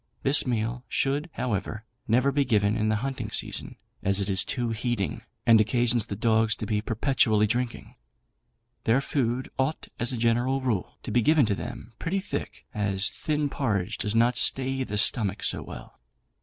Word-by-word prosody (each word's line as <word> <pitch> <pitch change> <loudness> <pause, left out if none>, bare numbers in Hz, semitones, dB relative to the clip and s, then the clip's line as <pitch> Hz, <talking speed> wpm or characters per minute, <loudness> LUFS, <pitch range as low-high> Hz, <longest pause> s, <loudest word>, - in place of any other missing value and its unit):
This 135 0 +4
meal 120 +1 -1
should, 145 +5 0
however, 105 -2 -3 0.2
never 125 +5 +3
be 140 +1 +2
given 105 -4 +2
in 110 -1 0
the 110 - +2
hunting 135 -1 -4
season, - - -2 0.3
as 100 0 +2
it 100 0 -1
is 95 0 +4
too 120 -3 -2
heating, 110 - -2 0.2
and 115 -2 +7
occasions 120 +1 +1
the 100 - -4
dogs 110 0 +2
to - - -5
be 105 0 -1
perpetually 110 -2 +2
drinking. 120 +2 -2 0.9
Their 115 +4 +4
food 130 -2 -1
ought, 135 +4 -1
as 120 +1 +3
a 125 - -3
general 120 +3 +1
rule, 120 -8 -2
to - - -5
be 120 - +3
given 150 +2 +4
to 105 - 0
them 115 +3 -7
pretty 190 +4 -1
thick, 200 - -6
as 100 -2 +1
thin 150 -2 -1
porridge 105 -10 -2
does 105 +1 0
not 120 +2 +3
stay 135 0 +1
the 105 -4 -4
stomach 105 -1 +1
so - - +2
well. - - -11
115 Hz, 175 wpm, -26 LUFS, 105-130 Hz, 0.9 s, and